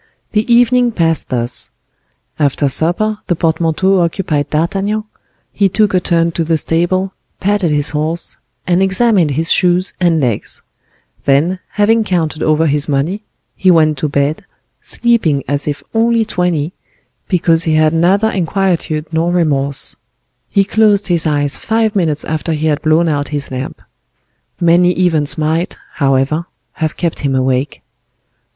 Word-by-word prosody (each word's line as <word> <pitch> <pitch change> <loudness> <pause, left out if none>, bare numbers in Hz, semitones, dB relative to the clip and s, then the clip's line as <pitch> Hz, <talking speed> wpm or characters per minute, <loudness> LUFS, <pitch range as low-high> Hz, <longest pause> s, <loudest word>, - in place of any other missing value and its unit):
The 220 +2 0
evening 245 +1 +4
passed 165 -4 0
thus. 120 -1 -1 0.7
After 145 -1 +1
supper 180 +10 +1
the 175 - +1
portmanteau 165 +3 +1
occupied 165 -4 -1
D'Artagnan, 195 +7 -1 0.5
he 200 -1 +2
took 210 +1 +1
a 185 - +4
turn 170 -1 +1
to 165 - -2
the 160 0 +1
stable, 185 +4 0 0.3
patted 200 -2 +1
his 150 0 +1
horse, 160 +3 -2 0.3
and 180 0 +2
examined 195 -3 +3
his 160 +4 -1
shoes 180 +1 +2
and 170 -3 +2
legs; 120 -7 -1 0.6
then, 155 +7 +2
having 220 +2 +3
counted 165 -6 -2
over 155 +1 +2
his 150 0 +1
money, 150 +9 -1 0.3
he 190 - +2
went 155 -3 +4
to 155 - -1
bed, 140 +2 -1 0.4
sleeping 220 - 0
as 145 +1 -2
if 145 -1 -3
only 230 0 +2
twenty, 180 -4 -1 0.5
because 165 -3 +2
he 160 -1 +1
had 155 0 +3
neither 195 +7 +2
inquietude 175 -4 -1
nor 165 +2 +1
remorse; 140 -5 0 0.5
he 200 - +3
closed 205 0 +2
his 170 -2 +2
eyes 145 -1 0
five 220 -1 0
minutes 160 -6 0
after 160 +1 -2
he 155 0 -2
had 150 -1 0
blown 160 +2 +2
out 145 -2 -1
his 145 -2 -4
lamp. 130 +1 -5 0.8
Many 175 +1 +4
events 165 -6 +1
might, 160 +3 -1 0.2
however, 140 +4 0 0.3
have 160 -4 -3
kept 170 -2 -2
him 140 -3 -1
awake. 130 +1 -1
165 Hz, 145 wpm, -15 LUFS, 150-190 Hz, 0.8 s, evening